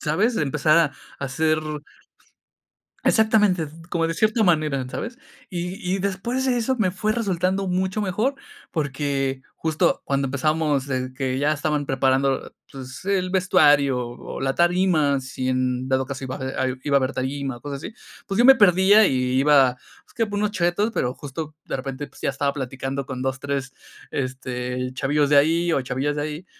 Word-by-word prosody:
¿sabes? 210 +10 +1
Empezar 150 +2 +3
a 165 - +5 0.3
a 140 - -4
hacer 155 +3 +1 1.4
exactamente, 210 -7 +3 0.2
como 165 -1 +1
de 165 - -2
cierta 215 +3 +2
manera, 155 -7 +2
¿sabes? 235 - -6 0.3
Y 180 0 -4 0.2
y - - -1
después 200 +7 -2
de 255 -2 +2
eso 255 +3 0
me 185 -4 +2
fue 210 +3 -1
resultando 190 -3 0
mucho 185 +3 -1
mejor, 215 +8 0 0.4
porque 140 -3 -1 0.2
justo 160 -1 0
cuando 140 -1 0
empezamos, 145 0 0
en 130 0 -2
que 130 -1 -2
ya 145 +2 +2
estaban 150 -1 -1
preparando, 135 0 +1 0.2
pues, 130 +4 -9
el 190 -2 0
vestuario 145 -8 +4
o 120 +2 -8
la 135 0 0
tarima, 175 -5 +3
si 130 -1 -4
en 130 0 0
dado 130 0 +1
caso 135 -1 -6
iba 130 - -4
a 130 0 -2 0.2
iba 140 -1 +2
a - - +7
haber 130 0 -1
tarimas, 135 -1 -3
cosas 140 -1 -5
así. 220 - -7 0.3
Pues, 195 - -3
yo 240 - +5
me 265 0 +9
perdía 200 +1 +6
y 135 - +1 0.2
iba, 135 -3 +5 0.3
pues, - - -25
que 230 - +2
unos 210 0 0
Cheetos, 205 +3 +1
pero 125 - -1
justo 150 +2 -7
de - - -2
repente, 135 +2 -5
pues, - - -17
ya - - 0
estaba 140 +1 -1
platicando 135 0 -4
con 130 -2 -5
2, 130 0 -1
3, 140 -1 -3 0.4
este, 125 -1 -3
chavillos 145 +2 +1
de 145 - +5
ahí, 165 +4 +3
o 135 - +2
chavillas 135 +3 -2
de 145 - -1
ahí. 155 +4 -5
145 Hz, 175 wpm, -23 LUFS, 135-185 Hz, 1.4 s, me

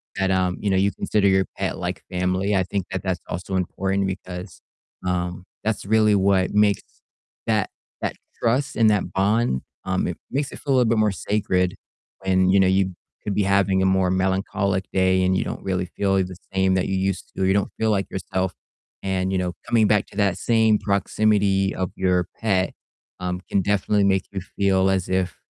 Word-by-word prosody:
that, 95 0 +1
um, 90 -1 +1
you 105 - -1
know, 95 - +2
you 100 +2 +3
consider 105 -2 +1
your 95 0 +3
pet - - -2
like - - -4
family, 95 +2 0
I 95 - +3
think 95 0 -3
that 95 - -3
that's 95 -2 -2
also 95 +2 -4
important 95 +2 -1
because, 90 -2 -6 0.5
um, 90 0 -2 0.2
that's 110 -2 -1
really 105 0 +4
what 95 -1 +2
makes 105 -2 +3 0.7
that - - +1 0.3
that - - -2 0.3
trust 125 +5 +1
and 115 -2 +5
that 105 -2 0
bond, 100 - +1 0.2
um, 95 0 0
it 90 - -4
makes 140 +1 -1
it - - -9
feel 140 - -1
a - - +4
little 120 -3 +3
bit 115 - +2
more 110 -2 +3
sacred 95 -2 0 0.5
when, 95 0 +3
you 95 +1 +5
know, 95 - +5
you 95 0 +2 0.3
could 100 - -2
be 105 - +2
having 95 -1 +2
a - - +3
more 95 -1 +3
melancholic 95 +1 0
day 95 0 +3
and 95 0 +2
you - - +1
don't - - -6
really 95 -1 -1
feel 95 +2 -1
the 95 -1 -1 0.2
same 95 0 +2
that 95 -1 +1
you 95 - -1
used 95 0 -2
to, - - 0
or - - +3
you 95 - +3
don't 100 0 +1
feel 110 -1 +2
like 100 -2 0
yourself, 95 -1 -2 0.5
and, 95 -1 -1
you 95 - +1
know, 90 -1 -1
coming 115 -3 +4
back 105 -1 +3
to - - -15
that 100 -3 +2
same 110 -2 +3
proximity 100 -1 +1
of 95 -1 -3
your 90 -2 +1
pet, 95 -4 +1 0.5
um, 90 0 -2
can 100 - +2
definitely 100 +1 +1
make 95 -1 +2
you 100 -2 -4
feel 95 0 +1
as 95 -2 0
if, 95 -1 -1
95 Hz, 200 wpm, -23 LUFS, 95-100 Hz, 0.7 s, and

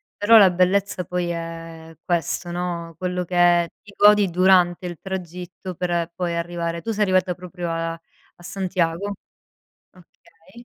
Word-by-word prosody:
però 225 +2 +6
la 195 -3 +7
bellezza 185 +1 +1
poi 180 +1 -2
è 165 -1 -7
questo, 175 0 -2
no, 170 -2 -4
quello 180 0 -2
che 175 -1 +3
ti 205 - -15
godi 205 -2 +5
durante 180 0 +3
il 175 -1 -5
tragitto 180 -1 -7
per 175 -1 -2
poi 175 -2 -2
arrivare 170 0 -3
tu 225 - -3
sei 210 - -3
arrivata 185 -1 +2
proprio 180 -1 -6
a 165 0 -2 0.5
a 175 - -17
Santiago? 185 +1 -2 0.8
Okay. 180 +4 -19
180 Hz, 140 wpm, -22 LUFS, 170-185 Hz, 0.8 s, la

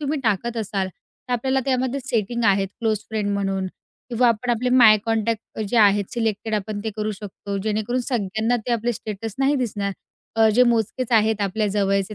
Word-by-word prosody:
तुम्ही 295 +1 -1
टाकत 235 +1 0
असाल, 200 -3 -2
तर 250 +6 -12
आपल्याला 265 +2 +1
त्यामध्ये 260 0 0
सेटिंग 235 -2 -1
आहेत. 195 -1 +3
क्लोज 220 -2 +1
फ्रेंड 215 -2 -2
म्हणून 195 -1 -1 0.4
किंवा 240 +1 +3
आपण 235 +2 0
आपले 240 +1 0
माय 240 -4 +7
कॉन्टॅक्ट 225 0 0 0.2
अ, - - -2
जे 240 - -1
आहेत, 205 -2 +5
सिलेक्टेड 220 -1 -1
आपण 210 0 -3
ते 220 - -1
करू 215 0 -1
शकतो. 200 0 -6
जेणेकरून 220 +4 -1
सगळ्यांना 220 0 0
ते 245 - 0
आपले 235 +1 0
स्टेटस 215 -1 -6
नाही 275 +2 +3
दिसणार. 205 -6 -2 0.4
अ, 225 0 +5
जे 250 - +6
मोजकेच 240 +1 +1
आहेत 220 -1 +3
आपल्या 205 +2 0
जवळचे 195 0 0
220 Hz, 185 wpm, -23 LUFS, 205-240 Hz, 0.4 s, माय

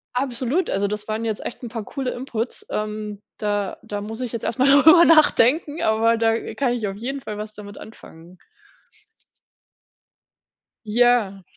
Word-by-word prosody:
Absolut, 260 +6 -1
also, 200 +1 0
das 210 +1 -5
waren 220 +1 -3
jetzt 220 -2 -4
echt - - -6
'n 235 - -5
paar 225 -2 -5
coole 265 +1 -4
inputs. 245 -2 -5
Ähm, 210 -1 -4 0.2
da 205 -2 -2
da 205 -2 -5
muss 220 +4 -7
ich 245 - -4
jetzt 235 - -5
erst 230 - -2
mal 265 - +4
drüber 320 +5 +7
nachdenken, 310 0 +4
aber 225 +1 +2
da 225 0 0
kann 255 -3 0
ich 225 -4 -2
auf 195 - -5
jeden 270 +5 -5
Fall 210 -3 -7
was 215 0 -7
damit 205 -1 -11
anfangen. 175 -5 -14 2.5
Ja. 215 -4 +2
225 Hz, 160 wpm, -22 LUFS, 210-255 Hz, 2.5 s, drüber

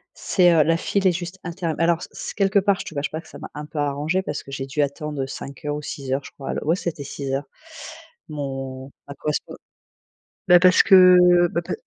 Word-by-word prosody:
c'est, 180 -3 +3
heu, 160 -2 +5
la 165 +1 +2
file 195 +3 -1
est 180 - +5
juste 175 +2 -6
interm 170 -2 -3
alors 170 0 +2
c - - -8
c - - -6
quelque 195 0 +3
part 200 -1 +2
je - - -5
te 160 - -9
cache 140 0 -2
pas 160 - -5
que - - -19
ça - - -12
m'a - - -9
un 150 0 -6
peu 150 0 -8
arrangée 145 +5 -1
parce 150 -5 -5
que - - -13
j'ai 135 -1 -5
dû 140 +2 -1
attendre, 145 0 -3
heu, 130 - -2
5 135 +1 -9
heures 145 0 -2
ou 150 - -6
6 135 -2 -6
heures 135 +1 -1
je - - -11
crois, 135 - -7
l - - -3
ouais, 165 +4 +2
c'était 155 -6 -5
6 135 -1 -5
heures, 135 +2 -1 0.9
mon 135 -2 -6 0.2
ma 140 - -7
correspond 150 +2 -3 0.9
bah, 180 -1 +7
parce 185 0 +6
que 180 -3 +7
bah 170 - -2
pa - - -4
155 Hz, 245 wpm, -22 LUFS, 140-180 Hz, 0.9 s, bah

